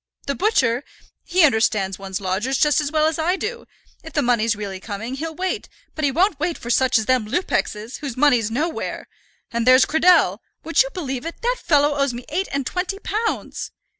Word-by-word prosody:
The 280 Hz, -, -1 dB
butcher, 275 Hz, -, +1 dB, 0.4 s
he 360 Hz, 0 st, +2 dB
understands 215 Hz, -8 st, +2 dB
one's 190 Hz, -1 st, -4 dB
lodgers 205 Hz, +8 st, -1 dB
just 300 Hz, +1 st, +3 dB
as 290 Hz, -1 st, -3 dB
well 310 Hz, -1 st, +2 dB
as 320 Hz, +1 st, 0 dB
I 345 Hz, +4 st, +1 dB
do, 470 Hz, +5 st, -5 dB, 0.4 s
if 320 Hz, -, -10 dB
the -, -, +1 dB
money's 230 Hz, -2 st, +2 dB
really 200 Hz, -2 st, -6 dB
coming, 220 Hz, +5 st, -6 dB
he'll 320 Hz, +4 st, -5 dB
wait; 370 Hz, +2 st, -3 dB, 0.2 s
but 310 Hz, -, -5 dB
he 285 Hz, -, +4 dB
won't 340 Hz, +3 st, +1 dB
wait 335 Hz, +2 st, -1 dB
for 240 Hz, -, -5 dB
such 260 Hz, 0 st, +3 dB
as 220 Hz, -, -1 dB
them 250 Hz, -2 st, +1 dB
Lupexes, 225 Hz, -, -2 dB
whose 275 Hz, -5 st, -6 dB
money's 250 Hz, -6 st, +3 dB
nowhere. 310 Hz, +8 st, -3 dB, 0.4 s
And 235 Hz, 0 st, -1 dB
there's 255 Hz, +1 st, +7 dB
Cradell; 320 Hz, -, +4 dB, 0.2 s
would 330 Hz, +6 st, +3 dB
you -, -, 0 dB
believe 270 Hz, -8 st, -4 dB
it, 335 Hz, +6 st, -7 dB
that -, -, 0 dB
fellow 290 Hz, -1 st, +3 dB
owes 275 Hz, -3 st, 0 dB
me 240 Hz, -, -8 dB
eight 370 Hz, +6 st, -1 dB
and 275 Hz, -1 st, -2 dB
twenty 365 Hz, +6 st, -2 dB
pounds!" 435 Hz, +3 st, -3 dB
280 Hz, 195 wpm, -21 LUFS, 230-330 Hz, 0.4 s, there's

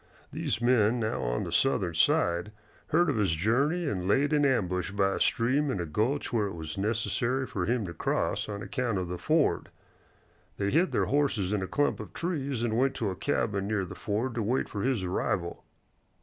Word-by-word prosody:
These -, -, -1 dB
men 120 Hz, -1 st, +3 dB
now 110 Hz, -1 st, -1 dB
on -, -, -1 dB
the -, -, -5 dB
Southern 95 Hz, -10 st, +2 dB
side 85 Hz, +4 st, +2 dB, 0.4 s
heard 175 Hz, +3 st, +3 dB
of 145 Hz, -6 st, 0 dB
his 100 Hz, -6 st, +2 dB
journey 140 Hz, -, +1 dB
and 90 Hz, -9 st, -2 dB
laid 140 Hz, +8 st, +2 dB
in 145 Hz, -1 st, +4 dB
ambush 90 Hz, -9 st, 0 dB
by 100 Hz, 0 st, +1 dB
a -, -, -3 dB
stream 135 Hz, +6 st, +2 dB
in 115 Hz, -, -1 dB
a 85 Hz, -, -2 dB
gulch 115 Hz, -, -1 dB
where 110 Hz, -3 st, +2 dB
it 95 Hz, -, -6 dB
was 80 Hz, -2 st, -6 dB
necessary 115 Hz, +5 st, 0 dB
for 90 Hz, -7 st, -3 dB
him 120 Hz, -2 st, 0 dB
to 85 Hz, -, -6 dB
cross -, -, -1 dB
on 100 Hz, 0 st, -5 dB
account 125 Hz, -6 st, -1 dB
of 90 Hz, -2 st, -3 dB
the 90 Hz, -1 st, -4 dB
ford. 155 Hz, -1 st, +1 dB, 0.9 s
They 100 Hz, 0 st, 0 dB
hid 170 Hz, +6 st, +3 dB
their -, -, +1 dB
horses 115 Hz, -9 st, +1 dB
in 105 Hz, -, 0 dB
a 95 Hz, -, -3 dB
clump 145 Hz, +8 st, 0 dB
of -, -, -8 dB
trees 140 Hz, -8 st, -2 dB
and 115 Hz, -2 st, 0 dB
went 135 Hz, +1 st, +2 dB
to 105 Hz, -4 st, -1 dB
a -, -, -5 dB
cabin 100 Hz, +2 st, -1 dB
near 105 Hz, -3 st, 0 dB
the -, -, -8 dB
ford 115 Hz, +5 st, -2 dB
to 115 Hz, -, -2 dB
wait 120 Hz, +5 st, 0 dB
for 100 Hz, -, -5 dB
his 125 Hz, -5 st, 0 dB
arrival. 90 Hz, -1 st, -2 dB
110 Hz, 205 wpm, -29 LUFS, 95-135 Hz, 0.9 s, in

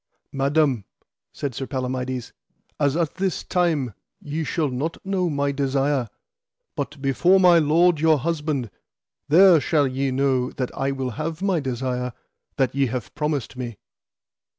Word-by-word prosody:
Madam, 140 Hz, -4 st, +1 dB, 0.5 s
said 140 Hz, -3 st, -4 dB
Sir 135 Hz, +3 st, -5 dB
Palamides, 130 Hz, -2 st, -3 dB, 0.5 s
as 145 Hz, 0 st, +2 dB
at 165 Hz, -3 st, 0 dB
this 190 Hz, -2 st, -1 dB
time, 160 Hz, -, 0 dB, 0.3 s
ye 155 Hz, +2 st, -4 dB
shall 155 Hz, -1 st, -1 dB
not 140 Hz, +6 st, -3 dB
know 190 Hz, -2 st, 0 dB
my 140 Hz, -1 st, 0 dB
desire, 135 Hz, -2 st, 0 dB, 0.7 s
but 145 Hz, +1 st, -4 dB
before 175 Hz, +8 st, +4 dB
my 175 Hz, -2 st, +6 dB
lord 165 Hz, +2 st, +3 dB
your 160 Hz, 0 st, +4 dB
husband 150 Hz, -5 st, -2 dB, 0.6 s
there 175 Hz, +2 st, +7 dB
shall 145 Hz, -1 st, +2 dB
ye 135 Hz, +1 st, -1 dB
know 130 Hz, -1 st, +1 dB
that 130 Hz, -2 st, -4 dB
I 135 Hz, -, -1 dB
will 135 Hz, -2 st, -2 dB
have 165 Hz, +3 st, -4 dB
my 190 Hz, -4 st, +2 dB
desire 125 Hz, -2 st, -3 dB, 0.4 s
that 130 Hz, -3 st, +1 dB
ye 135 Hz, 0 st, +2 dB
have 120 Hz, -1 st, -5 dB
promised 150 Hz, -4 st, -2 dB
me. 120 Hz, -4 st, -6 dB
140 Hz, 145 wpm, -23 LUFS, 130-160 Hz, 0.7 s, there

